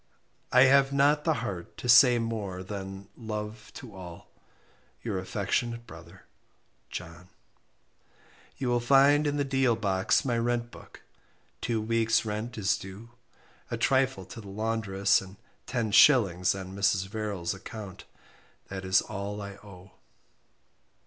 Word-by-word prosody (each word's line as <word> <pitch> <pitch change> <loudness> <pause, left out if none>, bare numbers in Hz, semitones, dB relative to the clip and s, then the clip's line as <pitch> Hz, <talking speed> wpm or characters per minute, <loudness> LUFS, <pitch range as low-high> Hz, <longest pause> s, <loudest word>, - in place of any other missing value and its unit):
I 125 - +6
have 135 0 +5
not 145 +2 +3
the 160 - +3
heart 90 -6 -6
to - - -6
say 125 0 +7
more 105 -5 -4
than 95 0 -7
love 105 -2 -6
to 120 -5 -10
all. 90 -3 -11 0.7
Your 105 -5 -2
affectionate 115 +5 -2
brother 85 +2 -13 0.7
JOHN." 90 +1 -9 1.3
"You 130 -2 -2
will 120 0 +2
find 140 +4 +4
in 145 0 -1
the 145 - +1
deal 135 -3 +2
box 100 +4 +1
my 120 -3 0
rent 120 0 -1
book - - -14 0.6
2 115 -2 -1
weeks 115 +1 +1
rent 110 +2 -4
is 95 -4 +1
due, 100 +5 -11 0.6
a - - -3
trifle 130 -7 +1
to 115 - -10
the 100 - -11
laundress, 105 -1 +1
and 95 0 -12 0.3
10s. 105 -5 +4
on 95 0 -8
Mr. 100 -1 +1
Verrall's 100 -3 -3
acc't 100 -1 -9 0.6
that 95 -1 -6
is 95 0 +3
all 105 0 -5
I 100 -1 -6
owe." 100 -2 -14
105 Hz, 135 wpm, -28 LUFS, 95-120 Hz, 1.3 s, say